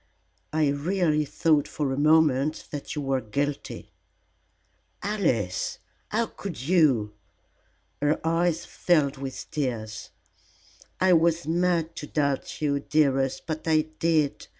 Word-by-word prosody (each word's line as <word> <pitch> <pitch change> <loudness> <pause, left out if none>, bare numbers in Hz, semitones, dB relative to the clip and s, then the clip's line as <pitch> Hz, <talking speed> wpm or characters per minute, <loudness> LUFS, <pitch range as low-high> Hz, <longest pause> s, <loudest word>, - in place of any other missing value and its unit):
I 155 -1 +2
really 155 +1 +1
thought 150 0 +2
for 140 -3 -2
a - - -1
moment 150 -1 +3
that 145 +1 -5
you 150 - -3
were 135 -1 0
guilty." 140 +6 -4 1.1
"Alice, 155 - 0 0.3
how 230 +2 +1
could 200 -6 -7
you?" 135 - +2 0.9
Her 145 +2 +2
eyes 165 0 +1
filled 150 -5 +1
with 135 -1 -6
tears. 115 -8 -3 0.9
"I 185 -1 +5
was 170 0 +3
mad 170 0 +1
to 150 - -6
doubt 140 0 -1
you, 140 -1 +1
dearest, 135 -3 +1
but 160 0 -4
I 155 -1 +4 0.2
did. 160 -4 +1
150 Hz, 120 wpm, -26 LUFS, 135-165 Hz, 1.1 s, I